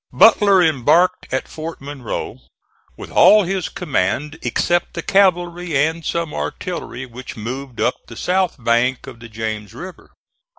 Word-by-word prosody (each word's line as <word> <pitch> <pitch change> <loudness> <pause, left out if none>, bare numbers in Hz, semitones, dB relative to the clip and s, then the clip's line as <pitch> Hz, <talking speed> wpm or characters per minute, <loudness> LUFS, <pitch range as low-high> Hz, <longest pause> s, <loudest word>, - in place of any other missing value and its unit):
Butler 200 -4 +6
embarked 165 +5 +2
at 130 - -2
Fort 160 +1 -7
Monroe 135 -4 -6 0.6
with - - -9
all 210 0 +6
his 185 -3 -2
command, 150 - -2
except 175 0 0
the 170 - -4
cavalry 175 -4 +2
and 160 +4 0
some 170 -2 -2
artillery 130 -8 -5
which 125 0 -10
moved 125 +3 -6
up 125 - -1
the 115 - -11
south 185 0 0
bank 120 +1 +1
of 130 -4 -11
the 115 -1 -11
James 110 -2 -5
River. 185 +1 -10
155 Hz, 140 wpm, -19 LUFS, 125-175 Hz, 0.6 s, Butler